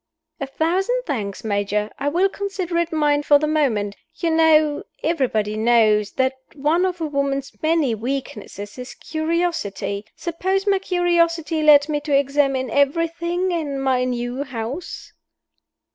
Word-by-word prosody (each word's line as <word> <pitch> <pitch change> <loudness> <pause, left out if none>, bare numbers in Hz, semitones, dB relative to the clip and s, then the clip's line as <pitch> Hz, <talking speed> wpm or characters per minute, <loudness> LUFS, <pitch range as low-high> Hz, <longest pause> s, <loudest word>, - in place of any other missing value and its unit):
"A 275 - -3
thousand 380 - 0
thanks, 210 - -4
Major; 210 0 -1
I 280 +1 0
will 355 +6 +3
consider 390 -3 -3
it 340 -1 -1
mine 295 -2 +2
for 290 0 +5
the 295 - -1
moment. 240 -10 0 0.2
You 335 0 -1
know 310 -2 +4 0.2
everybody 235 -10 0
knows 215 -2 +3
that 260 0 +1 0.2
one 305 +6 +2
of 360 -2 -5
a - - 0
woman's 280 -2 -2
many 315 -6 +2
weaknesses 220 -3 -5
is 250 +1 -8
curiosity. 315 - -2
Suppose 375 +3 -2
my 395 -2 +3
curiosity 340 -3 +1
led 295 -1 +6
me 300 -1 -1
to 290 -2 +2
examine 275 -2 +1
everything 335 +6 0
in 300 -5 -2
my 260 -2 +1
new 245 +1 -2
house?" 265 +5 -6
290 Hz, 140 wpm, -21 LUFS, 250-335 Hz, 0.2 s, led